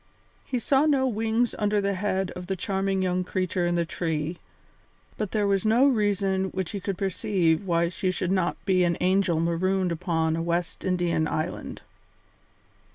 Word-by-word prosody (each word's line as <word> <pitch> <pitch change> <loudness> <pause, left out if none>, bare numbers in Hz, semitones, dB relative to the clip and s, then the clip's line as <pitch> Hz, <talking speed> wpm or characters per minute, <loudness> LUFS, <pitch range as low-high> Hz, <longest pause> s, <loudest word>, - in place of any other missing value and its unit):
He 255 - -3
saw 270 +5 +2
no 270 -3 +3
wings 225 +1 0
under 210 -1 +2
the 200 0 0
head 190 -1 -1
of 180 0 -8
the 190 - -1
charming 195 +1 -1
young 180 0 0
creature 185 -1 -1
in 175 - 0
the 170 0 +1
tree, 160 0 -3 0.8
but 210 - -3
there 210 -2 +1
was 195 -1 +1
no 230 +5 +4
reason 200 -5 +1
which 190 -2 -4
he 200 - -4
could 195 -1 -3
perceive 185 -2 0
why 170 -1 +2
she 185 +1 -2
should 185 0 -1
not 185 -2 +1
be 185 -2 +3
an 170 -1 +1
angel 185 -3 +2
marooned 180 +2 +1
upon 160 -2 0
a 165 - -2
West 170 +1 -2
Indian 175 -3 +1
island. 155 +1 -4
185 Hz, 170 wpm, -26 LUFS, 170-200 Hz, 0.8 s, no